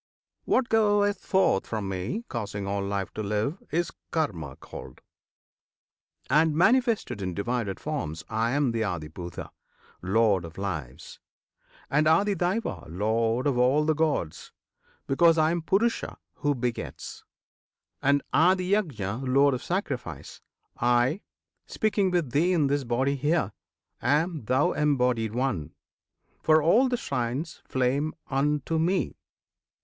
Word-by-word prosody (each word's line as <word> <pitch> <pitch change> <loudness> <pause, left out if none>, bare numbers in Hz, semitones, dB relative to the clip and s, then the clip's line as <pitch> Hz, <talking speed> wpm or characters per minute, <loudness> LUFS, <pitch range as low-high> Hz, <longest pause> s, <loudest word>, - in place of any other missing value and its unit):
What 255 -1 +2
goeth 205 -2 +3
forth 190 - +2
from 105 -3 -3
Me, 95 - -3
Causing 100 -4 -4
all 100 0 -2
life 100 -1 -3
to - - -4
live, 105 - -2
is 170 +2 -1 0.2
KARMA 85 - -2
called: - - -11 1.3
And, 155 0 +3
Manifested 220 - +2
in 90 -2 -3
divided 115 -2 -2
forms, 80 +2 -4
I 115 +1 0
am 140 -3 +2
the 115 -1 -2
ADHIBHUTA, 85 -3 -5 0.5
Lord 100 -1 +2
of 85 -1 -10
Lives; 90 -10 -5 0.7
And 150 +2 +2
ADHIDAIVA, 190 - +1
Lord 115 +7 0
of 135 -4 +1
all 135 +5 +3
the 155 - +3
Gods, 145 - -1 0.5
Because 165 +4 +4
I 155 0 +3
am 170 0 -1
PURUSHA, 210 +8 0 0.2
who 145 -1 0
begets. 120 -2 -5 0.8
And 140 0 +3
ADHIYAJNA, 165 - +1
Lord 140 +2 +4
of 125 - -3
Sacrifice, 130 - -4 0.4
I 120 - +2 0.5
speaking 205 -3 +1
with 175 -8 0
thee 170 +7 +2
in 160 -5 +3
this 140 0 +1
body 130 +4 +1
here 145 - 0 0.5
Am, 155 -2 +1
thou 130 +5 +2
embodied 125 -7 +1
one! 125 - -2 0.7
(for 155 0 +5
all 235 - +4
the 245 - 0
shrines 130 - -3
Flame 135 +4 0 0.2
unto 150 +3 0
Me!) 180 +4 0
135 Hz, 125 wpm, -27 LUFS, 110-165 Hz, 1.3 s, for